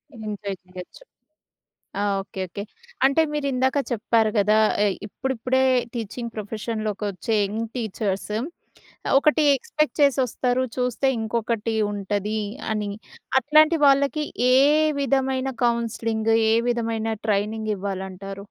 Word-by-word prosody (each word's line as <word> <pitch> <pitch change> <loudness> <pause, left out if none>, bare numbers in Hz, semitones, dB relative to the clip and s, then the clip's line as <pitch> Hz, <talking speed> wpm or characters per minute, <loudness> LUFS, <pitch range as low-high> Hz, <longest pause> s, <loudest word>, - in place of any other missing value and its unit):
Enjoy 205 -3 -5
చేయచ్చు. 180 - -11 1.0
ఆ! - - 0 0.2
Okay. 195 0 -7
Okay. 200 +3 -6 0.4
అంటే 275 +4 +4
మీరిందాక 270 -2 0
చెప్పారు 225 -1 +2
గదా! 210 +2 +4 0.3
ఎ - - +4 0.2
ఇప్పుడిప్పుడే 260 +2 -1 0.3
టీచింగ్ 235 +1 -5
ప్రొఫెషన్‌లోకొచ్చే 215 0 -3
యంగ్ 220 +3 -3
టీచర్స్ 210 -3 -3 0.9
ఒకటి 305 +2 +3
ఎక్స్‌పెక్ట్ 305 +3 -1
చేసొస్తారు. 255 -2 +2
చూస్తే 250 +1 0
ఇంకొకటి 225 0 -1 0.2
ఉంటది 205 +1 -2 0.3
అని, 210 -1 -2 0.5
అట్లాంటి 310 +5 +4
వాళ్ళకి 280 +2 +3 0.3
ఏ - - +6 0.5
విధమైన 265 -1 0
కౌన్సిలింగ్, 230 -1 0 0.2
ఏ - - +4 0.2
విధమైన 225 -2 -1
ట్రైనింగివ్వాలంటారు? 200 -2 -3
225 Hz, 95 wpm, -24 LUFS, 205-260 Hz, 1.0 s, ఏ